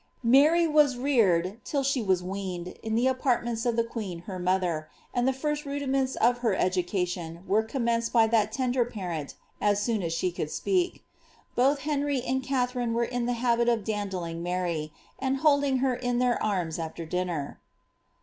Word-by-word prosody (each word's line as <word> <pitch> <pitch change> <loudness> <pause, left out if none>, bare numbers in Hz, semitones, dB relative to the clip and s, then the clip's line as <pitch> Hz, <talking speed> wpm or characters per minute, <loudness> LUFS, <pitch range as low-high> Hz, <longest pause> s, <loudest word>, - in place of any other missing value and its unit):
Mary 295 +8 +5
was 300 -5 +4
reared, 210 -6 +2
till 280 -2 -1
she 275 -1 +1
was 190 -4 +1
weaned, 185 -2 -4
in 220 0 -2
the 235 +2 +2
apartments 245 -3 0
of 235 - +1
the 230 - +2
qneei 195 -7 -6
ner 185 -2 -5
mother,* 180 -4 0 0.2
and 245 +1 +1
the - - +4
first 295 +3 -2
rudiments 275 -2 -1
of 245 +2 +2
her 230 -5 +1
education 180 -2 -1
were 205 +4 +3
commeoeed 230 -1 -1
by 230 -2 +5
that 220 -2 +2
tender 250 0 +1
parent 180 -10 -5 0.3
as 205 -1 +3
soon 220 0 0
as 165 -2 -2
she 170 +2 0
could 155 -3 -4
speak. 365 - -1 0.5
Both 275 +3 +2
Henry 285 -1 0
and 265 +1 0
Katharine 250 -3 -1
were 235 - +2
in 245 0 -2
the 245 - +1
habit 235 0 +3
of 230 -3 +1
dandling 190 -6 -3
Mary, 175 -3 -2 0.3
and 270 0 0
holding 280 -2 +3
her 260 - +2
in 245 0 -1
their 250 -1 +1
arms 180 -6 -1
after 165 0 -5
dinner. 175 -4 -3
230 Hz, 175 wpm, -27 LUFS, 185-260 Hz, 0.5 s, Mary